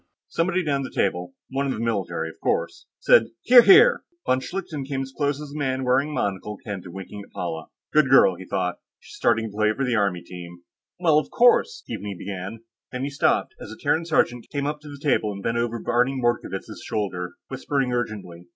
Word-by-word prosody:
Somebody 180 +2 0
down 140 -2 0
the 130 - -5
table 90 -2 -1 0.2
one 140 +1 -1
of 135 - 0
the - - -6
military, 95 -8 -1
of 80 - -15
course - - -1
said, 115 - +5 0.2
"Hear, 245 0 +9
hear!" 445 - +7 0.2
Von 130 - +2
Schlichten 170 -1 -5
came 135 0 -3
as 135 0 -10
close 145 -1 0
as 150 -1 -8
a 150 - -5
man 130 -2 -1
wearing 130 +4 +2
a - - -6
monocle 100 -5 -3
can 100 -3 -4
to 90 - -11
winking 95 +3 -8
at - - -19
Paula. 80 -2 -5 0.3
Good 150 -3 +4
girl, 135 -8 +6
he 90 +1 -10
thought; 90 -2 -2 0.2
she's - - -15
started 115 -1 +1
playing 110 +1 +1
on 135 - 0
the 125 - 0
Army 100 -5 +1
team! 85 -1 -10 0.4
"Well, 160 -4 +4
of - - -6
course...." 460 - +3
Keaveney 100 -1 -5
began. 100 +4 -6 0.3
Then 125 0 -4
he 140 - -2
stopped, 140 - +1
as - - -8
a 110 - -9
Terran 155 +3 0
sergeant 125 -7 +1
came 140 -2 -2
up 150 +1 -2
to 150 - -11
the 145 - -9
table 135 -7 +1
and 100 -1 -8
bent 115 0 0
over 120 0 -1
Barney 125 +3 +1
Mordkovitz' 120 -1 -2
shoulder, 90 -4 -3
whispering 135 -3 -1
urgently. 100 -8 -4
120 Hz, 210 wpm, -24 LUFS, 100-145 Hz, 0.4 s, Hear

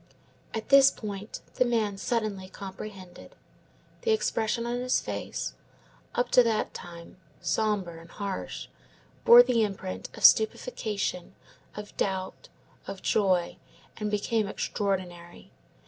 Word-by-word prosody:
At 220 - -5
this 275 -1 +8
point 205 0 -7 0.2
the - - +7
man 225 -4 0
suddenly 200 -3 -2
comprehended. 190 -1 -9 0.7
The 480 - -2
expression 235 - +1
of 240 +1 -2
his 250 0 +1
face, - - -4 0.6
up 245 0 0
to 250 - +8
that 225 -3 0
time 170 0 -10 0.2
sombre 195 -7 -1
and 165 - -15
harsh, 200 -1 -5 0.6
bore 240 +1 +10
the 245 -2 +2
imprint 195 -2 -4
of - - +2
stupefaction, 215 - +2 0.4
of 210 0 -8
doubt, 190 - -3 0.4
of 195 - -7
joy, 185 -5 +2 0.4
and 210 -1 -2
became 210 +1 0
extraordinary. 180 -4 -4
210 Hz, 115 wpm, -28 LUFS, 190-235 Hz, 0.7 s, bore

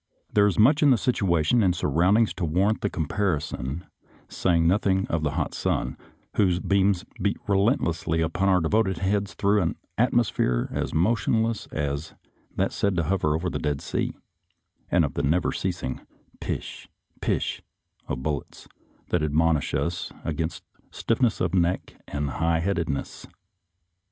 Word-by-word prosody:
There 105 -1 +5
is 100 - 0
much 130 +8 +5
in 145 - +6
the 130 - +5
situation 100 - +2
and 90 -4 +3
surroundings 90 +9 +2
to 95 - -5
warrant 95 +7 +1
the 100 - 0
comparison, 80 -4 -2 0.4
saying 85 -2 +1
nothing 95 +1 +2
of 80 - 0
the 75 -2 -1
hot - - -1
sun, - - -1 0.4
whose 90 -4 +3
beams 100 -1 +2 0.2
beat 100 +1 +1
re 100 - +2
lentlessly 90 - +1
upon 85 +4 +1
our 95 -1 +4
devoted 95 +2 +1
heads 100 +2 -1
through 100 +1 +2
an 80 - 0 0.2
atmosphere 115 - +2
as - - -2
motionless 110 +5 +1
as 75 +1 -3 0.4
that - - +1
said 100 -2 0
to 85 - +1
hover 75 -3 +1
over 85 +3 -2
the - - -2
Dead 75 -2 -1
Sea, - - -3 0.7
and 85 -2 +3
of 70 - -4
the 70 - -1
never 80 +5 +1
ceasing 85 -8 -3 0.2
" - - -32
pish," - - -5 0.2
" - - -36
pish," - - -1 0.5
of 65 - -4
bullets, 75 -3 -4 0.4
that 90 - +1
admonish 75 0 +1
us - - -2
against 80 +1 -3 0.3
stiffness 115 -1 0
of 90 -1 0
neck 90 0 0
and 70 0 -2
high 80 +4 +1
headedness. 85 -5 -2
90 Hz, 155 wpm, -25 LUFS, 80-100 Hz, 0.7 s, in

